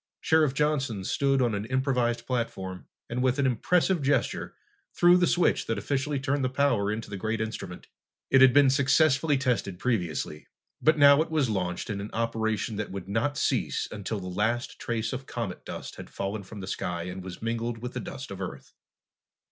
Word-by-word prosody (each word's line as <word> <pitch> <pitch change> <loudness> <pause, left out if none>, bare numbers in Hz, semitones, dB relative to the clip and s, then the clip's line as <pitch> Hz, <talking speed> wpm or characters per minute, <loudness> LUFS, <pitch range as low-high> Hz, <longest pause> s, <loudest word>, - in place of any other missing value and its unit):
Sheriff 155 -4 +3
Johnson 135 -9 0
stood 135 +5 +1
on 120 -3 +1
an 100 0 -2
improvised 125 -2 0
platform 95 -7 -3 0.2
and 120 +1 -2
with 130 +1 +2
an 140 - +2
impressive 170 - +2
gesture 140 +1 0 0.4
threw 175 0 +6
the 180 -1 +4
switch 175 - +2
that 115 - -1
officially 140 +6 -1
turned 140 0 0
the 130 - +1
power 130 -7 +1
into 110 +1 -4
the 100 - -6
great 110 +3 -2
instrument. 110 0 -5 0.5
It 135 - +6
had 130 -1 +8
been 140 0 +6
successfully 140 +2 +3
tested 120 -8 -1
previously, 90 - -2 0.3
but 155 0 +4
now 140 0 +7
it 165 - -2
was 150 -7 +1
launched 90 -3 -2
in 100 -1 -3
an 105 - -6
operation 110 -2 -1
that 105 - -3
would 95 -1 -6
not 115 +8 -1
cease - - 0
until 105 0 -4
the 90 - -8
last 110 +7 -1
trace 115 -1 -2
of 130 +1 -6
comet 110 -7 -5
dust - - -7
had - - -9
fallen 100 +2 -4
from 100 +1 -10
the - - -5
sky 90 -3 -3
and 90 +1 -6
was 95 +3 -8
mingled 115 +1 -2
with 125 +2 -6
the - - -3
dust 135 -3 -7
of 100 - -7
the 95 - -2
Earth. - - -14
120 Hz, 195 wpm, -27 LUFS, 100-135 Hz, 0.5 s, had